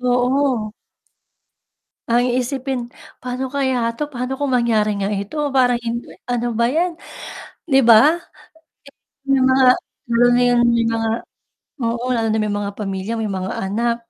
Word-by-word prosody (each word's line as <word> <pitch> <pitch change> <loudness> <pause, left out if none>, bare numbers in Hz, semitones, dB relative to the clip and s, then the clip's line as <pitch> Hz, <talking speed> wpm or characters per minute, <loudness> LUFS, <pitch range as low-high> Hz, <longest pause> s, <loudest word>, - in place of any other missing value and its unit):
Oo. 250 -2 +1 1.4
Ang 240 +1 +3
iisipin, 260 +1 -2 0.4
"Paano 255 +1 -4
kaya 260 -3 0
'to 295 +2 -4
paano 250 +1 -3
kung 285 -2 -1
mangyari 230 -4 +2
nga 195 - 0
ito 200 +6 -4 0.2
parang 245 -2 +3 0.5
ano 240 -1 -1
ba 235 +1 +1
'yan." 340 +7 0 0.8
'Di 270 - +5
ba 240 +9 +6 1.1
may 275 -1 +3
mga 260 0 +4 0.5
lalo 235 +1 +4
na 245 - +3
'yon 245 0 +3
may 235 -1 +2
mga 225 0 0 0.7
oo, 235 0 -2
lalo 225 -2 0
na 220 - +1
may 210 -1 -1
mga 205 0 -3
pamilya, 195 0 -4
may 220 -2 -2
mga 190 0 -3
anak, 230 +4 0
240 Hz, 140 wpm, -20 LUFS, 225-260 Hz, 1.4 s, ba